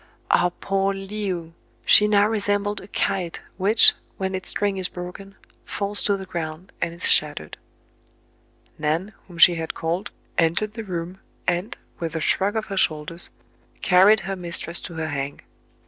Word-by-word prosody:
Ah, 175 0 +4
poor 195 0 0
Le 200 +1 -4
ou! 170 -3 -4 0.3
she 210 - +7
now 205 -1 +4
resembled 205 -1 0
a 190 - -12
kite, 190 -4 -2 0.2
which, 205 +4 +6 0.2
when 190 0 -2
its 190 0 -3
string 200 -1 0
is 185 -1 +1
broken, 180 +2 -9 0.3
falls 200 0 +1
to 200 -1 +2
the 190 - -7
ground 170 0 -6
and - - 0
is 170 - -2
shattered. 145 - +2 1.2
Nan, 160 +7 -1
whom 175 -2 -12
she 175 +1 +8
had 165 -1 -4
called, 170 +5 -2 0.3
entered 170 +6 +1
the 225 - -6
room, 180 -1 -5 0.3
and, 180 +5 -1 0.2
with 165 -1 -4
a - - 0
shrug 195 +6 +1
of 220 - -1
her 195 - -5
shoulders, 160 0 0 0.5
carried 195 +4 +6
her 195 +2 -4
mistress 170 -1 -1
to 170 - -8
her 160 0 -3
"hang." 140 -1 -4
185 Hz, 160 wpm, -23 LUFS, 170-200 Hz, 1.2 s, she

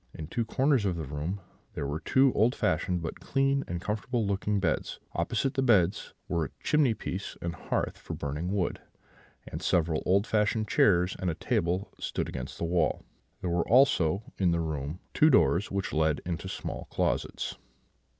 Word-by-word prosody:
In 80 - -6
two 115 +9 -2
corners 130 0 +2
of 95 -3 0
the 80 - -3
room 75 +8 -4 0.3
were 70 +2 -2
two 130 +8 +3
old 120 +5 +3
fashioned 90 -3 0
but 80 - -5
clean 135 0 +1
and 85 - -3
comfortable 110 +4 -1
looking 100 +1 0
beds; 85 -5 -1
opposite 135 0 0
the 135 - 0
beds 100 -8 +2
were 85 -2 0
a - - -6
chimney 145 -7 +3
piece 95 -1 -5
and 85 -1 -3
hearth 85 - -2
for - - -6
burning 75 +5 -3
wood; 100 -3 -1 0.7
and - - -6
several 80 -3 +1
old 100 +3 +4
fashioned 110 0 +1
chairs 90 -3 +3
and 90 - 0
a 80 - -1
table 90 +5 -1
stood - - -2
against 65 0 -6
the - - -4
wall; 85 -2 +1 0.4
there 90 - -1
were 85 0 0
also 110 - +4 0.2
in 95 -3 +3
the 85 0 +1
room 75 -1 -3 0.2
two 155 - +5
doors, 105 - +4
which 100 -1 -2
led 80 -1 +2
into 90 +1 -3
small - - -5
closets. - - -1
95 Hz, 175 wpm, -29 LUFS, 85-110 Hz, 0.7 s, two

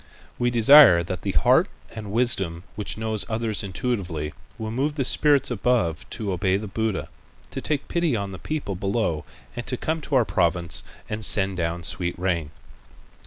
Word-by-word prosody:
We 120 0 +2
desire 120 - +8
that 90 +2 -5
the - - -2
heart - - +4 0.3
and 110 -3 -7
wisdom 95 -8 0
which 105 0 -3
knows 110 -1 -2
others 110 -1 -1
intuitively 90 -6 -3 0.2
will 110 -1 -4
move 140 +6 -1
the 135 -4 -1
spirits 145 -1 +3
above 110 -8 0
to 105 -3 -3
obey 95 +1 +1
the 105 +1 -6
Buddha, 110 0 -2 0.4
to - - -5
take 145 -2 -2
pity 170 -6 0
on 100 -2 -3
the 95 - -8
people 150 -10 -3
below 95 -4 -1 0.3
and - - -4
to - - -1
come 160 0 -2
to 145 - -2
our 125 -3 +4
province 85 -2 +1 0.3
and 110 +1 -5
send 95 -2 +3
down 85 0 -2
sweet 85 +1 -3
rain." 85 -4 -1
105 Hz, 170 wpm, -24 LUFS, 90-120 Hz, 0.4 s, desire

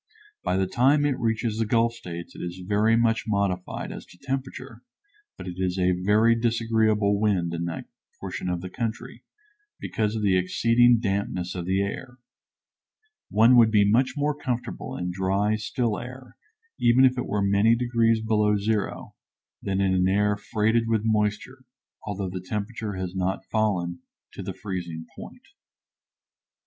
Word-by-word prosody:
By 90 - 0
the 95 - +2
time 135 +9 +3
it 140 -3 0
reaches 115 -1 -1
the 115 - +1
Gulf 115 +1 +2
States 85 -7 -8
it - - -10
is 90 +1 -6
very 105 +2 +3
much 115 0 +2
modified 100 -3 -2
as - - -8
to - - -17
temperature, 130 +1 -5 0.6
but - - -8
it 90 -1 -6
is 90 0 -1
a 90 0 +2
very 105 +6 +3
disagreeable 110 -3 +1
wind 95 -6 +1
in 85 0 -2
that 85 - -5 0.3
portion 90 - -4
of 90 -1 -2
the 95 - -6
country, 115 +1 -5 0.6
because 110 0 -2
of 110 - -2
the 95 -2 +3
exceeding 115 +6 +4
dampness 95 -4 -2
of 90 -2 -5
the 95 +1 +1
air. 125 +5 -6 1.1
One 115 +4 +5
would 115 -2 +7
be 105 -2 +4
much 130 +5 +2
more 145 +1 +1
comfortable 125 -4 -4
in 90 0 -3
dry, 95 +3 0
still 110 +1 -2
air, 125 +1 -10 0.4
even 120 +3 +5
if 130 0 +3
it 125 - -3
were 105 -1 0
many 100 +3 +4
degrees 115 -2 +2
below 105 -1 +2
zero, 105 0 -2 0.5
than 95 -1 -1
in 95 -1 +2
an 90 0 +2
air 105 +2 +2
freighted 110 +2 0
with 110 -2 +1
moisture, 110 +4 -1 0.4
although 100 -2 -3
the 90 0 -5
temperature 105 +2 -4
has 95 0 -5
not 95 +1 -2
fallen 90 -6 0 0.3
to - - -7
the - - -6
freezing 85 -5 -5
point. - - -11
105 Hz, 160 wpm, -25 LUFS, 95-115 Hz, 1.1 s, would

